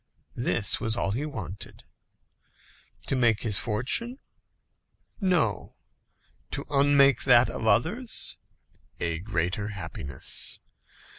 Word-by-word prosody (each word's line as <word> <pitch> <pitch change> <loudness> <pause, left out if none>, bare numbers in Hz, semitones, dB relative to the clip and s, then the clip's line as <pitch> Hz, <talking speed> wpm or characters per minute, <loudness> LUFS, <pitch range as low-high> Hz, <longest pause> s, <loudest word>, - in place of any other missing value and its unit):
This 115 -4 +2
was 110 -2 -1
all 110 -4 -1
he 135 +8 -2
wanted. 100 - -7 1.2
To - - 0
make 120 -4 +2
his 105 -4 +1
fortune? 130 - 0 1.0
No. 170 - +1 0.7
To - - -3
unmake 140 -2 +4
that 125 -2 +6
of 110 - -4
others? 205 - +1 0.6
A 85 -1 -2
greater 95 +1 -2
happiness. 85 -9 -2
115 Hz, 95 wpm, -27 LUFS, 100-140 Hz, 1.2 s, that